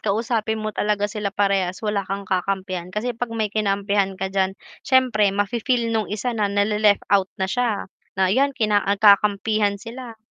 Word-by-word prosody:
kausapin 220 +1 -1
mo 215 - -2
talaga 210 -1 0
sila 210 -1 -2
parehas 195 -1 0
wala 210 -1 0
kang 195 +1 -4
kakampihan. 185 -1 -2
Kasi 215 +6 -3
'pag 235 +1 -4
may 215 -2 -1
kinampihan 200 -2 0
ka 190 0 -4
diyan, 190 0 0 0.2
siyempre 250 -6 +3
mafi-feel 230 +4 0
no'ng 220 -1 -1
isa 215 +4 -2
na 210 -3 0
nale-left 205 +1 +2
out 195 -2 +3
na 190 - -1
siya, 225 +2 -1 0.3
na 190 0 +2
ayan, 275 +2 +1
kina 210 -4 +2
nagkakampihan 205 0 +3
sila. 230 +1 -9
205 Hz, 165 wpm, -22 LUFS, 195-225 Hz, 0.3 s, siyempre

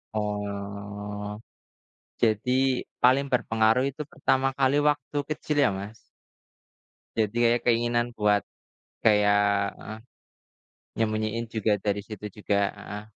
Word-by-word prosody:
Oh. 105 0 -4 0.8
Jadi, 115 +2 +2 0.5
paling 130 +3 +5
berpengaruh 115 0 +3
itu 140 +3 -8
pertama 135 -4 +1
kali 135 +1 +3
waktu 145 -1 0
kecil 150 0 -2
ya, - - +4
Mas? 105 +3 -7 1.2
Jadi 110 +2 0
ada 120 +1 +3
keinginan 120 0 +2
kuat 105 -1 +3 0.6
kayak 105 -1 +5 0.4
heeh. 110 +1 -8 1.0
Nyembunyiin 110 +1 0
juga 110 -1 +1
dari 100 0 0
situ 105 -1 -7
juga. 105 -1 0 0.2
Heeh. 105 0 -7
110 Hz, 105 wpm, -26 LUFS, 105-120 Hz, 1.2 s, paling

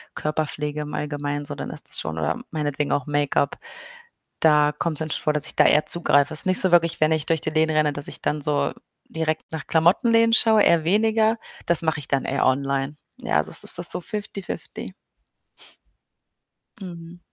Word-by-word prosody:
Körperpflege 150 -1 -3
im 150 0 -7
Allgemein 145 -1 -4
so, 145 0 -6
dann - - -6
ist - - -5
das - - +3
schon 80 0 -5
oder 80 +1 -2
meinetwegen 150 -2 -3
auch 140 - -2
Make-up, 145 -1 0 0.8
da 150 -1 +4
kommt‘s 160 -3 -3
dann 160 -1 -4
schon - - -4
vor, 150 - +1
dass 150 0 +2
ich - - -5
da - - +4
eher 150 - +3
zugreife. 145 -4 +2
Ist 155 - +5
nicht 185 - +7
so 185 - +2
wirklich, 170 -1 +3
wenn 155 - +3
ich 155 -2 -2
durch 165 -1 +1
die - - -2
Läden 160 0 +1
renne, 150 -1 +2
dass 145 0 -4
ich - - -9
dann 150 0 -2
so 150 0 -1 0.4
direkt 160 -1 -3
nach 160 -2 -7
Klamotten-Läden 230 +8 +3
schaue, 220 -2 +4
eher 170 -2 +3
weniger, 220 +4 +2 0.3
das 170 -1 +3
mache 160 -2 -1
ich - - -8
dann 135 -2 0
eher 140 - -1
online. 135 +2 -1 0.2
Ja, - - -1
also, 75 - -1
es - - +2
ist - - +5 0.2
so - - -1
fifty-fifty. 205 -2 -7 1.9
Mhm. 175 -1 -10
155 Hz, 190 wpm, -22 LUFS, 145-170 Hz, 1.9 s, nicht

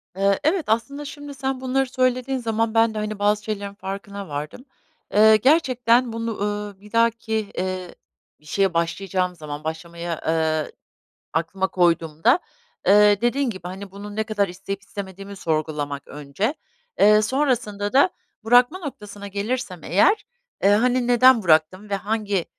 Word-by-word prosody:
Eee, 195 0 +2
evet, 330 +3 +2
aslında 260 +7 -1
şimdi 290 0 -8
sen 265 -1 -3
bunları 265 +1 +1
söylediğin 255 +1 0
zaman 225 -1 -1
ben 225 0 +3
de, - - -6
hani, 215 -1 -3
bazı 205 0 +2
şeylerin 200 -2 -4
farkına 200 0 -7
vardım. 150 - -6 0.5
Eee, 215 +1 +7
gerçekten 250 -2 +3
bunu, 230 -1 -4
ııı, 205 -1 -3
bir 210 +1 -16
dahaki, 230 -2 +1
eee, 185 -1 -3 0.4
bir 150 - -26
şeye 195 +3 +1
başlayacağım 180 +2 -1
zaman, 150 -2 -7
başlamayı, 170 +2 -6 0.2
ııı, 160 -1 0 0.6
aklıma 185 +5 -1
koyduğumda, 170 - +2 0.5
eee, 205 0 +6
dediğin 245 +2 +1
gibi, 190 -5 -8
hani, 195 +2 -8
bunu 205 +2 -9
ne 220 - 0
kadar 205 -3 0
isteyip 195 +2 -6
istemediğimi 200 -1 -8
sorgulamak 150 -4 -3
önce. 150 - -3 0.4
Eee, 210 +1 +6
sonrasında 225 -5 0
da 280 +7 +5 0.3
bırakma 245 +9 +4
noktasına 210 - -8
gelirsem 205 -2 -4
eğer, 385 - +3 0.4
eee, 200 - +5
hani, 245 +4 +3
"Neden 245 -1 +6
bıraktım 180 +5 +2
ve - - +1
hangi, 205 -2 -1
205 Hz, 145 wpm, -23 LUFS, 185-240 Hz, 0.6 s, Eee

